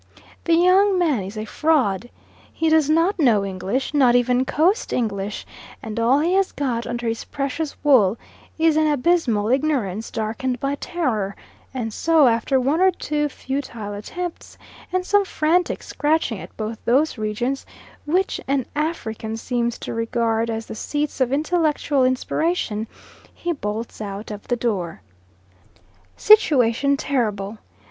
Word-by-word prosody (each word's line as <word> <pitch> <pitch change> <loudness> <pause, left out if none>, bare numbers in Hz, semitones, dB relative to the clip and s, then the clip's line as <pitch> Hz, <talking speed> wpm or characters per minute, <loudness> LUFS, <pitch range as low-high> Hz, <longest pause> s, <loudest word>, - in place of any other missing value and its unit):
That 335 - +4
young 370 +3 +4
man 310 - +2
is 195 +3 -7
a 215 - -3
fraud. 245 - +1 0.4
He 325 - 0
does 315 -2 +3
not 335 +5 +2
know 225 -9 +3
English 195 +9 -3
not 260 -4 +4
even 250 +1 +2
coast 345 - +1
English 205 -3 -2 0.4
and 220 0 -4
all 250 +5 +3
he 340 +4 +1
has 390 0 +2
got 245 -5 -2
under 240 0 -3
his 225 0 -2
precious 280 +2 -3
wool 235 -8 +4 0.4
is 320 -1 +3
an 310 0 +3
abysmal 275 -8 +1
ignorance 250 -7 0
darkened 230 +3 -3
by 275 +2 -1
terror; 250 - -2 0.4
and 235 -4 -4
so, 320 +1 +4
after 240 +3 +2
one 280 +7 +1
or 380 - +6
two 300 -4 -2
futile 255 -7 -5
attempts 345 +12 -6 0.3
and 370 0 0
some 410 +1 +3
frantic 350 -1 0
scratching 295 -8 0
at - - -11
both 220 0 -5
those 265 +1 +2
regions 240 +6 -2 0.4
which 370 +5 0
an 270 -2 0
African 225 -8 -3
seems 235 0 -2
to - - -6
regard 230 0 0
as 225 0 -3
the - - -8
seats 290 +5 -3
of 255 -1 +2
intellectual 300 -2 +1
inspiration, 255 -3 0 0.5
he 345 - -3
bolts 220 -5 -5
out 205 +1 -6
of 210 -1 -8
the 245 - +1
door. 185 - -3 1.1
Situation 280 - +4
terrible! 215 -7 -2
255 Hz, 145 wpm, -22 LUFS, 225-310 Hz, 1.1 s, or